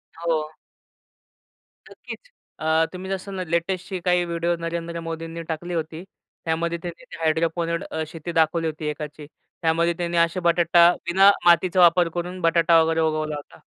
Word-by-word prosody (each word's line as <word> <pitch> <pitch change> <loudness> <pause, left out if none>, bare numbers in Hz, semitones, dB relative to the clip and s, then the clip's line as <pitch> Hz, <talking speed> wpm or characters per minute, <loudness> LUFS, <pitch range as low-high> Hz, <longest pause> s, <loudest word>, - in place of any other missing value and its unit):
हो. 160 -2 -2 1.4
नक्कीच. - - -11 0.3
अ, 160 +1 +2
तुम्ही 185 +1 -7
जसं 195 +1 -4
ना 185 - -3
लेटेस्टची 180 +2 -2
काही 180 -1 +3
व्हिडिओ 170 0 -1
नरेंद्र 170 0 -4
मोदींनी 165 0 -6
टाकली 175 +2 -4
होती. 160 0 -4 0.4
त्यामध्ये 165 +1 -1
त्यांनी 175 +5 -8
ते - - -8
हायड्रोपोनिक 165 +1 0
अ, 160 - -2
शेती 165 +1 -7
दाखवली 165 0 +1
होती 155 0 -5
एकाची. 150 0 -7 0.4
त्यामध्ये 165 +1 +2
त्यांनी 175 -1 -2
अशा 170 +2 +2
बटाटा 170 0 +5 0.2
विना 190 +3 +6 0.2
मातीचा 175 +2 +4
वापर 175 0 +5
करून 180 +1 -4
बटाटा 165 0 +4
वगैरे 160 0 +1
उगवला 155 -1 -1
होता. 145 - -11
170 Hz, 150 wpm, -23 LUFS, 160-175 Hz, 1.4 s, विना